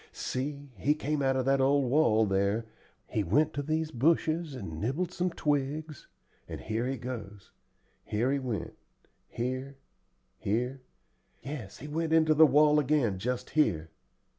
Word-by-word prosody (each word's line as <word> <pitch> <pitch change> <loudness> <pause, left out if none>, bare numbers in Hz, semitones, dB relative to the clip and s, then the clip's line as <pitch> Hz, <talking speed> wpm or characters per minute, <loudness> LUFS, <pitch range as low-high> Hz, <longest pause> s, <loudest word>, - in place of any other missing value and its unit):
See, 140 +1 -4
he 145 +10 +2
came 150 0 -2
out 135 -1 +2
of 130 -1 0
that 135 0 +3
old 135 -1 +3
wall 110 -7 +4
there, 100 +3 +1 0.4
he 105 - -1
went 145 - +2
to 145 - -2
these 155 +2 -1
bushes 155 +3 +1
and 80 -10 -6
nibbled 155 +10 -1
some 180 0 -1
twigs, 150 -1 -2 0.4
and - - -6
here 115 +3 -2
he 135 +1 -2
goes 105 -6 -7 0.5
here 115 +5 0
he 140 - +1
went 125 -6 -4 0.6
here 130 +3 -4 0.6
here 125 +6 -1 0.6
yes, 135 -9 -7
he 150 - -9
went 160 +2 -1
into 160 -1 +5
the 155 +1 +7
wall 150 +2 +5
again 135 -9 +1
just 125 +4 -3
here. 85 - +1
135 Hz, 150 wpm, -29 LUFS, 115-150 Hz, 0.6 s, the